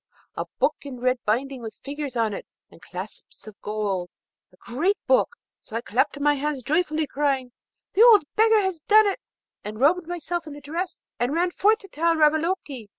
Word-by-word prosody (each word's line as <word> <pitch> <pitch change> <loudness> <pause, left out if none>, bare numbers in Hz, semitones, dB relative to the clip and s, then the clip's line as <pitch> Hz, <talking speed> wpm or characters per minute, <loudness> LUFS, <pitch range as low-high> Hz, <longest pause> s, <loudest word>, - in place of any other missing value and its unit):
a - - -3
book 305 - +2
in 270 -3 -8
red 255 0 +1
binding, 255 +4 -1
with 225 -1 -8
figures 285 -2 -5
on 225 -3 +1
it - - -7 0.2
and - - -17
clasps - - -9
of 215 -2 -11
gold, 205 -4 -2 0.4
a 185 - -24
great 320 - 0
book! - - +3 0.2
So 220 - -11
I 230 - -1
clapped 245 +5 0
my 295 +1 +3
hands 290 -2 -2
joyfully, 310 +2 +1
crying, 275 -3 -1 0.4
'The 400 - +3
old 455 -5 +8
beggar 440 0 +5
has 380 -4 -2
done 430 +1 +7
it!' 400 -2 0 0.4
and 215 +1 -7
robed 325 +5 +3
myself 345 -1 -4
in 300 - -7
the 290 - -9
dress, 335 +6 -4 0.2
and 245 +5 0
ran 350 +1 +1
forth 425 +5 +3
to 390 - -12
tell 335 -1 +1
Ravaloke. 310 - +1
295 Hz, 190 wpm, -24 LUFS, 250-350 Hz, 0.4 s, old